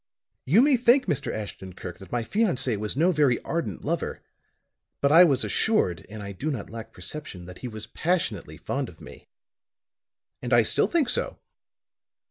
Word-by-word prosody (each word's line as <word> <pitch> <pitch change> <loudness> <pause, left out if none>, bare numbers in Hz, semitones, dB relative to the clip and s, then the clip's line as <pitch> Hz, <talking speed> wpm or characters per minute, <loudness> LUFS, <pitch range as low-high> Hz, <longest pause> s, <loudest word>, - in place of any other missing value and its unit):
"You 195 - +5
may 280 -2 +5
think, 250 +3 +4
Mr. 155 -8 -1
Ashton 95 -3 -6
Kirk, 90 0 -8
that 95 - -13
my 120 -1 0
fiancé 155 - +1
was 105 +4 -2
no 170 +5 +4
very 145 -7 +3
ardent 170 0 -3
lover. 165 +3 -2 0.8
But 140 - +2
I 165 +3 +9
was 140 -7 +3
assured, 95 - +1
and 105 0 -8
I 100 - -6
do 100 +11 -4
not 125 -9 -4
lack 115 0 -8
perception, 150 -13 -8
that 90 0 -11
he 125 - -5
was 110 -2 -7
passionately 170 +10 -2
fond - - -3
of - - -16
me. - - -13 1.1
And - - -2
I - - +6
still - - +2
think 330 -6 +2
so. - - 0
135 Hz, 175 wpm, -26 LUFS, 105-175 Hz, 1.1 s, I